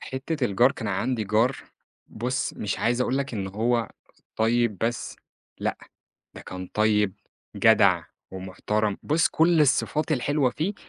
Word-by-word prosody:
حتة 135 +2 -3
الجار، 120 +5 +3
كان - - -5
عندي 125 -4 -1
جار 110 +6 +2 0.5
بُص 125 +4 -3
مش 105 -2 -3
عايز 120 +2 +1
أقول 125 +1 +1
لك 140 -3 -3
إن 100 -2 -3
هو 115 +3 0 0.5
طيب 115 -2 +1
بس، 115 0 -2 0.4
لأ، - - -2 0.6
ده - - -10
كان 95 0 -7
طيب، 105 -2 +2 0.4
جدع، - - +4 0.3
ومُحترم، 100 +3 -2
بُص 160 +2 +2
كل 165 0 +4
الصفات 150 +2 +1
الحلوة 140 0 +1
فيه، 175 +10 -2
120 Hz, 140 wpm, -25 LUFS, 105-135 Hz, 0.6 s, جدع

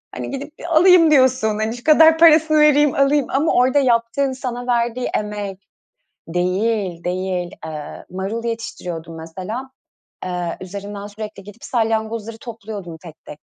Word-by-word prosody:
Hani - - -5
gidip 280 +2 -6 0.2
alayım 335 0 +6
diyorsun 260 -4 +4
hani 220 +1 -1
şu 240 - -13
kadar 320 +1 +6
parasını 315 -1 +5
vereyim 295 -1 +4
alayım 275 0 +3
ama 285 +4 +1
orada 255 +3 +3
yaptığın 255 +2 +1
sana 250 -2 -5
verdiği 240 0 0
emek 205 -2 -5 0.7
Değil, 180 +1 -1
değil. 180 -1 -2 0.2
Iıı, 150 -2 -8
marul 195 +5 -4
yetiştiriyordum 175 -8 -5
mesela. 190 +11 -7 0.6
Iıı, 180 -2 -3
üzerinden 200 +2 -7
sürekli 210 -1 -8
gidip 205 +3 -14
salyangozları 225 -1 -2
topluyordum 210 -7 -8
tek 165 -1 -14
tek. 150 - -10
225 Hz, 135 wpm, -20 LUFS, 190-265 Hz, 0.7 s, alayım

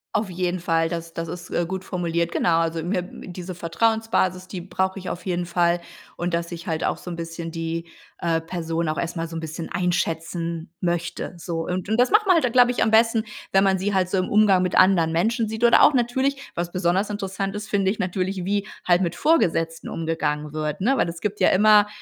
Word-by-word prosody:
Auf 210 -2 0
jeden 180 0 -2
Fall, 165 -1 +1
das 165 -1 -5
das 165 0 -4
ist, 175 +1 -7
äh, 175 - 0
gut 190 +2 -5
formuliert, 170 -2 -1
genau. 165 -2 +2
Also 165 -1 -1
mir 180 +2 0
diese 180 0 -8
Vertrauensbasis, 185 +1 0
die 185 - -5
brauche 190 +2 -2
ich 185 - -6
auf 180 - -6
jeden 175 -2 -1
Fall 170 0 +2 0.4
und 175 0 -2
dass 170 0 -1
ich 170 +1 -7
halt 160 -2 -1
auch - - 0
so - - -9
'n 175 - -4
bisschen 165 0 -6
die, 165 0 -3 0.3
äh, 165 -1 0
Person 165 -1 -3
auch 155 - -2
erst 170 +1 -3
mal 165 -1 -3
so 165 - -6
'n - - -2
bisschen 160 +1 -6
einschätzen 170 -1 -2
möchte, 175 0 -2
so. 170 -1 -4
Und 185 +1 -3
und 220 +2 0
das 245 +1 +3
macht 425 +1 +5
man 370 - +7
halt 330 - +3
dann, 250 - +1
glaube 245 0 +5
ich, 245 - +1
am 220 - +1
besten, 225 0 +4 0.3
wenn 195 0 +5
man 190 -1 +2
sie 205 +2 -1
halt 185 -2 +1
so 190 - 0
im 185 - 0
Umgang 205 -3 +5
mit 180 - -1
anderen 175 -4 +4
Menschen 225 +7 +1
sieht 220 +2 -5
oder 235 - +6
auch - - +7
natürlich, 265 +3 0
was 175 0 -3
besonders 185 +2 +1
interessant 195 -1 -3
ist, 210 0 -6
finde 195 -2 +2
ich 205 - -1
natürlich, 185 +1 -2
wie 200 +1 -1 0.2
halt 175 0 +3
mit 170 -2 -1
Vorgesetzten 165 - +1
umgegangen 155 -2 -2
wird, 155 +1 -3
ne, 265 +7 +2
weil - - +2
es 170 0 -7
gibt 210 +1 -2
ja - - +5
immer, 210 +1 +6
180 Hz, 230 wpm, -23 LUFS, 165-200 Hz, 0.4 s, man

